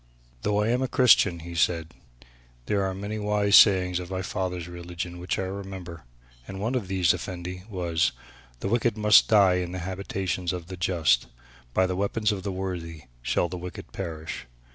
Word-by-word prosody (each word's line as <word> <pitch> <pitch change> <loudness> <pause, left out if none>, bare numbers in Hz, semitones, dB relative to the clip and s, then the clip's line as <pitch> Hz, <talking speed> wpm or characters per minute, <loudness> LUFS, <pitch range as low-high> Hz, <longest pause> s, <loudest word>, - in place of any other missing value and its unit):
"Though 105 0 +1
I 110 - 0
am 125 +2 +1
a 130 - +1
Christian," 105 - +4
he 85 +1 -8
said, 80 -1 0 0.7
"there 100 +4 +1
are 95 -1 -2
many 100 +3 -4
wise 105 0 +2
sayings 90 -3 +6
of 90 -1 -7
my 95 0 -3
father's 90 -3 -3
religion 85 0 -6
which 90 - -2
I - - -1
remember. 95 -5 -7 0.4
And 95 0 -7
one 115 +5 -1
of 120 -7 -1
these, 90 -3 +3
Effendi, 90 0 -6
was, 85 -5 0 0.5
'the 95 - -2
wicked 115 -1 +1
must 105 -1 +6
die 100 -4 +5
in 90 0 -5
the - - -4
habitations 95 -2 -3
of 90 -1 -6
the 95 - -5
just, 85 -8 +2 0.5
by 95 - +4
the 90 0 -2
weapons 105 +3 0
of 100 -2 -3
the 100 - -3
worthy 90 -4 -5 0.2
shall - - +1
the 90 +1 -6
wicked 90 +1 -8
perish.' 80 -8 -6
95 Hz, 185 wpm, -26 LUFS, 85-100 Hz, 0.7 s, sayings